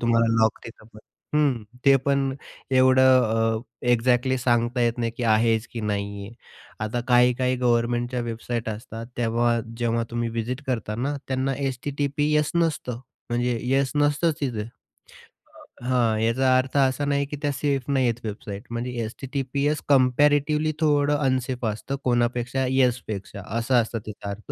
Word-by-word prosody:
तुम्हाला 115 -1 +3 0.2
लॉक 110 - +2
तिथं 110 -1 -12
पण. 110 - -13 0.4
हं, 140 -7 +2 0.2
ते 140 - +7
पण 135 -1 +1 0.4
एवढं 130 0 +5 0.6
अ, - - -8 0.3
एक्झॅक्टली 125 +2 +2
सांगता 120 0 +1
येत 120 0 +1
नाही 115 -1 -1
की 125 - -4
आहेच 115 +1 +2
की 115 - -4
नाही 100 -1 -3
आहे? 115 - -12 0.5
आता 115 +3 -2
काही-काही 125 +1 +3
गव्हर्नमेंटच्या 120 0 0
वेबसाईट 115 0 -4
असतात, 115 +1 -6
तेव्हा 120 0 +1 0.2
जेव्हा 115 -1 0
तुम्ही 120 0 -2
विजिट 120 +5 -3
करता 115 -4 -2
ना, 140 +6 -2
त्यांना 130 +1 0
एस-टी-टी-पी-एस 145 +3 0
नसतं. 155 -8 -1 0.3
म्हणजे 120 0 0
येस 135 +1 +1
नसतंच 150 +2 +2
तिथे. 120 -6 -2 1.2
अ, - - -9
हां, 120 -4 +2
याचा 130 +3 +3
अर्थ 130 +2 -1
असा 135 +1 +2
नाही 140 0 +1
की 145 +1 -7
त्या 145 - 0
सेफ 140 -1 -1
नाहीये 130 -4 +2
वेबसाईट. 105 -1 -6
म्हणजे 120 +2 -3
एस-टी-टी-पी-एस 140 +4 -2
कंपॅरेटिव्हली 145 +3 +3
थोडं 145 -1 +2
अनसेफ 130 -3 -1
असतं 110 +6 -3
कोणापेक्षा, 120 +1 0
येस 130 -2 +2
पेक्षा 100 -1 -6 0.2
असा 125 +2 +2
असतो 115 0 -2
त्याचा 100 -1 -7
अर्थ. 100 +2 -7
125 Hz, 145 wpm, -24 LUFS, 115-135 Hz, 1.2 s, ते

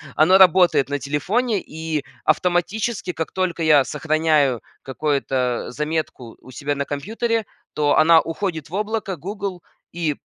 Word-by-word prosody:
оно 175 +5 +5
работает 180 -6 +5
на 145 - -1
телефоне, 200 - -1
и 160 -3 -5 0.2
автоматически, 180 +6 0
как 160 - -4
только 185 -3 -2
я 150 -3 +5
сохраняю 155 -6 +1 0.2
какое-то 130 -3 -1
заметку 150 -5 -4
у 130 - -14
себя 145 +3 -3
на 140 0 -2
компьютере, 225 - -2 0.3
то 145 -1 +2
она 165 +1 +6
уходит 165 -3 -4
в - - -16
облако 210 -2 -2
Google, 190 +1 -6 0.3
и 165 -4 -2
160 Hz, 135 wpm, -21 LUFS, 145-190 Hz, 0.3 s, она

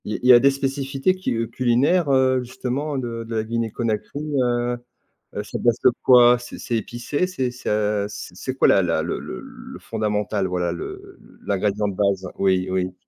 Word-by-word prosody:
Il 105 - -3
il - - +2
y - - +11
a 120 - +8
des 140 - +5
spécificités 135 +4 -1
qui, 185 - -2
heu, 115 0 -1
culinaires, 130 +8 +2
heu, 130 -1 +3
justement 130 +4 -3
de 115 -3 -4
de 115 0 -6
la 110 - 0
Guinée 115 0 -2
Conakry, 115 +5 -3 0.2
heu 120 0 0 0.6
heu, - - -2
c'est - - -6
à - - -7
base 120 -1 +2
de - - +6
quoi? 125 -1 +7
C'est 120 - -10
c'est 120 - -2
épicé? 120 - -2
C'est 130 -9 -2
c'est 125 - -6
à 105 -1 0
c 105 - -8
c'est 130 +7 -4
quoi - - +4
la 95 - +5
la 80 -2 +1
le 85 - -3
le - - -7
le - - -11
fondamental, 105 -2 -2
voilà, 90 -1 -1
le 85 - -8 0.3
l'ingrédient 105 +1 0
de 100 - -4
base? 100 -1 0
Oui, 95 -1 +2
oui. 95 0 -1
115 Hz, 205 wpm, -22 LUFS, 105-130 Hz, 0.6 s, y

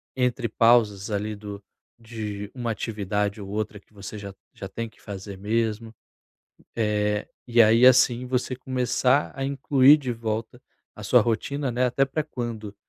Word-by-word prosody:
entre 125 -2 0
pausas 110 -4 +3
ali 105 +1 -2
do 100 -1 -9 0.4
de 105 -3 -6
uma 120 -3 -2
atividade 105 -1 -2
ou 100 - -8
outra 105 0 -3
que 105 - -30
você 100 +1 -8
já 100 -1 -8 0.2
já 95 - -7
tem 115 +3 -5
que - - -27
fazer 100 -1 -8
mesmo, 110 +2 -2 0.8
eh, 105 -2 0 0.2
e 120 0 +1
aí 115 +3 +6
assim 125 -1 +4
você 125 0 -1
começar 130 +2 +1
a 135 - -4
incluir 140 +1 +5
de 135 -4 -4
volta 110 0 -4 0.3
a - - -10
sua - - +5
rotina, 130 +4 -1
né, 125 +2 +1
até 125 +3 +2
pra 145 +3 -2
quando 115 -7 -6
115 Hz, 160 wpm, -25 LUFS, 105-125 Hz, 0.8 s, aí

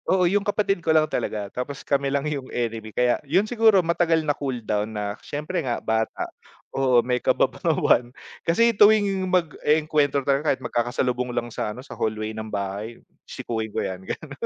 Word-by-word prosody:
Oo 185 -1 +4
'yung 200 +4 +2
kapatid 200 -2 0
ko 165 - -4
lang 155 -1 +5
talaga, 105 -8 -3
tapos 125 +2 -5
kami 140 -1 +1
lang 140 +1 -1
'yung 140 -4 -3
enemy, 115 -2 -3
kaya 125 +2 +1
'yun 170 +8 +2
siguro 220 -5 +4
matagal 165 -1 +2
na 145 - +2
cool 135 -3 -3
down 105 +1 -1
na 100 -1 -2
siyempre 150 +5 -3
nga 125 -5 -2
bata. 110 0 -1 0.5
Oo 130 -3 +3
may 125 0 0
kababawan 120 - +2 0.4
kasi 230 +8 +4
tuwing 205 -2 +4
mag-e-engkwentro 155 -4 +1
talaga 140 +2 +1
kahit 130 - -17
magkakasalubong 125 +1 -1
lang 120 0 -2
sa - - -2
ano 125 - -9
sa - - -9
hallway 110 0 -2
ng 110 0 -6
bahay, 100 +3 -4 0.3
sikuhin 110 -1 -4
ko - - -3
'yan 95 -1 -5
ganun, - - -6
140 Hz, 175 wpm, -24 LUFS, 115-165 Hz, 0.5 s, lang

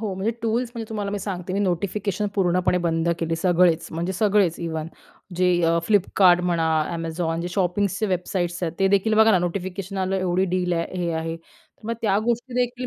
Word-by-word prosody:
हो 210 -4 -3
म्हणजे 190 +4 -1
टूल्स 230 +2 0
म्हणजे 225 -2 -6
तुम्हाला 205 -2 -3
मी 205 - -2
सांगते 185 -2 -5
मी 195 - 0
नोटिफिकेशन 200 +2 -1
पूर्णपणे 180 -1 +2
बंद 165 0 0
केली 165 -1 -1
सगळेच 175 -1 +3
म्हणजे 170 +3 -3
सगळेच. 195 -3 +2
इव्हन 160 -2 -3 0.5
जे 180 0 +3 0.2
अ, 165 0 +3
Flipkart 190 -3 +4
म्हणा 170 -2 +1 0.3
Amazon 165 0 -2
शॉपिंग्सच्या 200 +2 0
वेबसाईट्स 180 -1 -2
आहेत 165 -2 -1
ते 195 - +3
देखील 200 +3 +2
बघा 220 +1 +6
ना 190 - +4
नोटिफिकेशन 190 +2 -4
आलं 190 0 0
एवढी 185 0 +1
डील 180 -1 0
आहे 170 -1 0 0.2
हे 170 - -1
आहे 165 0 -3
तर 165 +5 -20
मग 230 - -1
त्या 200 -3 +2
गोष्टी 240 +2 -1
देखील 250 0 -1
185 Hz, 185 wpm, -23 LUFS, 170-205 Hz, 0.5 s, बघा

